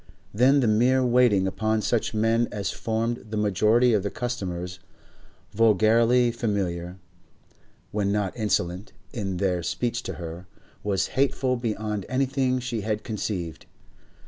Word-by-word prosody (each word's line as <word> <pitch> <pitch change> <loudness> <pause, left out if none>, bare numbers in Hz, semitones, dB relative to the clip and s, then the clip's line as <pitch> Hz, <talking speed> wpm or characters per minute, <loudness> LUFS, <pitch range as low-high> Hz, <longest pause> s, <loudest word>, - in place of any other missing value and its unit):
Then 130 +6 +4
the 120 - +2
mere 125 +4 +3
waiting 120 -6 +4
upon 110 +3 0
such 120 - 0
men 115 +2 +2
as 100 -2 -3
formed 115 +2 -2
the 110 - -3
majority 110 +4 +3
of 105 - +3
the 100 - -2
customers, 90 -8 -4 0.7
vulgarly 115 +3 +4
familiar, 95 -6 -2 0.9
when 100 -1 0
not 100 -2 -1
insolent, 95 -3 -1 0.2
in 95 -5 -3
their 90 -1 0
speech 120 +7 -2
to - - -5
her, 85 +1 -8 0.4
was 100 -2 0
hateful 130 -1 +1
beyond 105 -4 -3
anything 130 0 +1
she 120 -3 -3
had 105 +1 -2
conceived. 95 -7 -4
110 Hz, 130 wpm, -25 LUFS, 100-120 Hz, 0.9 s, Then